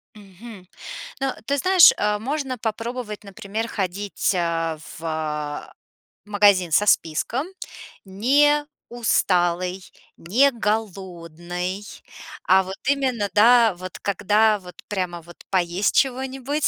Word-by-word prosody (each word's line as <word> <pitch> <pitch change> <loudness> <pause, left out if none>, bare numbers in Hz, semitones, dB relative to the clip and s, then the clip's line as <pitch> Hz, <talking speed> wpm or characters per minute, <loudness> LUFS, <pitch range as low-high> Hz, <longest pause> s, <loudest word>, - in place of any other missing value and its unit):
Мгм. 200 -1 -13 0.5
Но, 270 -1 -1
ты 280 - +1
знаешь, 370 +3 +7
э, 210 0 0
можно 265 +2 -3
попробовать, 225 0 -5
например, 210 +2 -5
ходить, 200 0 -2
э-э, 165 -2 -1 0.2
в, - - -13
э-э, 150 -2 -4 0.6
магазин 200 -4 +3
со 205 - +3
списком. 210 - +1 0.6
Не 285 +10 +3 0.2
усталой, 185 -6 0 0.4
не 250 +12 +3
голодной, 185 -4 -4 0.6
а 190 +1 +6
вот 190 +1 -7
именно, 260 -7 0
да, 230 0 +6
вот 185 0 -8
когда 210 +2 +2
вот 180 -1 -13
прямо 180 -4 -3
вот 170 +1 -15
поесть 180 +1 0
чего-нибудь. 265 +2 0
205 Hz, 110 wpm, -23 LUFS, 180-240 Hz, 0.6 s, знаешь